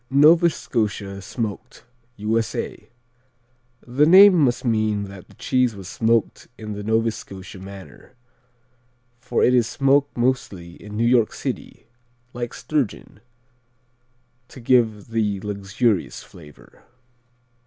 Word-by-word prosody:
Nova 160 +5 +6
Scotia 100 -8 -3
Smoked 110 0 -6 0.3
U.S.A. 110 +2 -3 1.0
The 130 +5 +2
name 195 +3 +9
must 135 -8 +1
mean 110 -3 0
that 100 -2 -11
the - - -19
cheese 125 -3 0
was 95 -2 -10
smoked 115 +2 0
in 110 -1 -7
the 105 - -6
Nova 110 +2 +1
Scotia 95 -2 -10
manner, 95 +5 -12 1.0
for - - -1
it 125 - +4
is 120 -3 +3
smoked 140 +1 +1
mostly 120 -8 -1
in 105 0 -8
New 115 - +1
York 120 -2 +3
City, - - -6 0.5
like 120 -1 -5
sturgeon, 145 -9 -3 1.3
to - - -13
give 115 -4 +1
the 105 -3 -1
luxurious 100 0 -1
flavor. 75 -4 -17
115 Hz, 115 wpm, -22 LUFS, 100-125 Hz, 1.3 s, name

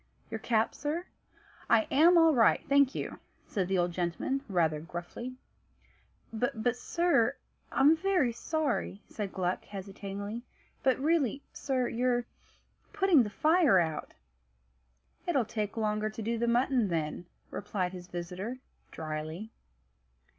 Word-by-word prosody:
"Your 225 - -3
cap, 225 -1 +1
sir?" 315 +5 -3 0.6
"I 225 -2 +5
am 335 +5 +6
all 325 -1 +6
right, 230 -5 +4
thank 280 -1 +4
you," - - -4 0.3
said 190 -4 -1
the 190 0 +1
old 175 0 +1
gentleman 175 +10 -1
rather 165 -5 +2
gruffly. 175 +10 -7 1.0
"But 245 0 0
sir 335 -3 +2 0.4
I'm 285 +4 +5
very 355 -7 +2
sorry," 280 - -2
said 205 -3 -5
Gluck, 180 -1 -1
hesitatingly; 200 +2 -6 0.4
"but 260 -1 +3
really, 285 -3 +1
sir 255 -3 -1
you're 245 0 +1 0.7
putting 385 -8 +5
the 215 - -1
fire 310 - +4
out." 160 -3 -1 1.1
"It'll 280 -9 +2
take 210 0 -3
longer 215 -1 0
to 215 +1 -7
do 230 +1 -1
the 235 - +1
mutton, 245 -1 +3
then," 165 0 -2 0.2
replied 190 -3 -2
his 180 -1 -8
visitor 180 +7 -5 0.3
dryly. 155 +6 -5
225 Hz, 125 wpm, -30 LUFS, 190-270 Hz, 1.1 s, am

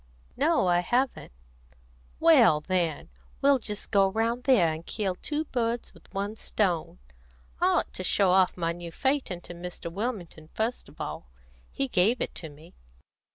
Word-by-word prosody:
"No, 305 - +2
I 175 -1 +4
haven't." 245 - -1 0.9
"Well, 150 - +6
then, 170 -1 -1 0.3
we'll 280 -1 +4
just 210 -2 -6
go 195 -2 +4
round 230 +4 -1
there, 185 - +4
and 160 +1 -7
kill 195 0 -2
two 300 +11 -3
birds 235 -3 -2
with - - -20
one 200 +2 -3
stone. 180 - -1 0.6
I - - +3
ought - - +1
to 185 - -5
show 190 +1 +3
off 185 0 +3
my 165 -1 0
new 170 0 -7
phaeton 265 - -1
to 175 - -10
Mr. 175 -1 -7
Wilmington 180 -6 -5
first 225 +3 -2
of - - -19
all; - - -5 0.4
he 275 - -1
gave 225 +2 +2
it - - -2
to 160 - -6
me. 155 +4 -16
195 Hz, 160 wpm, -27 LUFS, 175-240 Hz, 0.9 s, Well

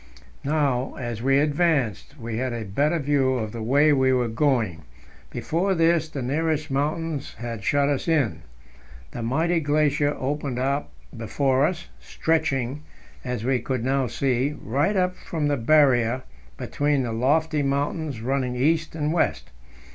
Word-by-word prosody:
Now, 140 -3 0
as 120 -3 -5
we 135 +2 +3
advanced, 145 - 0
we 115 -1 -4
had 130 0 -2
a 115 -2 -4
better 145 - +1
view 140 -3 +1
of 110 -4 -3
the 115 - -6
way 145 +6 +4
we 130 -1 +3
were 125 -2 +1
going; 115 - 0 0.5
before 190 +4 -1
this 165 -1 +2
the 140 -4 -5
nearest 155 +3 -1
mountains 150 +1 -2
had 115 -3 -6
shut 140 +6 +2
us 140 +2 -1
in. 150 -9 +1 0.7
The 120 - -6
mighty 160 +9 +1
glacier 145 -1 +1
opened 140 -1 -3
out 140 +3 -1 0.3
before 130 +4 +1
us, 170 -2 -5
stretching, 150 -4 -1 0.4
as 125 -3 -3
we 130 +1 +1
could 125 0 -3
now 135 -1 +1
see, 135 +3 0
right 145 - 0
up 180 -1 +1
from 155 -5 -3
the 145 - +2
Barrier 130 -2 +3 0.3
between 145 -2 0
the 115 -2 -3
lofty 150 +6 +1
mountains 140 -1 -2
running 130 0 -1
east 155 +5 +1
and 155 0 -1
west. 170 - 0
140 Hz, 150 wpm, -24 LUFS, 125-155 Hz, 0.7 s, way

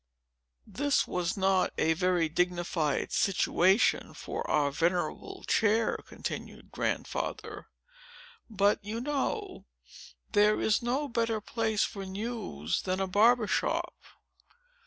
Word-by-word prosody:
"This 285 0 +1
was 180 +2 -2
not 190 -1 +2
a 160 - +3
very 180 -1 +1
dignified 175 -2 -1
situation 190 +1 +2
for - - -5
our 145 -2 +2
venerable 170 +2 -1
chair," 220 0 +2
continued - - -7
Grandfather; - - -3 0.8
"but, 205 -1 +2
you 215 +3 -4
know, 295 - -3 0.6
there 210 0 +4
is 215 - +2
no 260 +5 -1
better 230 -3 0
place 220 0 0
for 195 - -4
news, 190 - -3
than 185 0 -2
a 195 - +1
barber's 215 +2 +3
shop. - - 0
200 Hz, 110 wpm, -29 LUFS, 180-230 Hz, 0.8 s, there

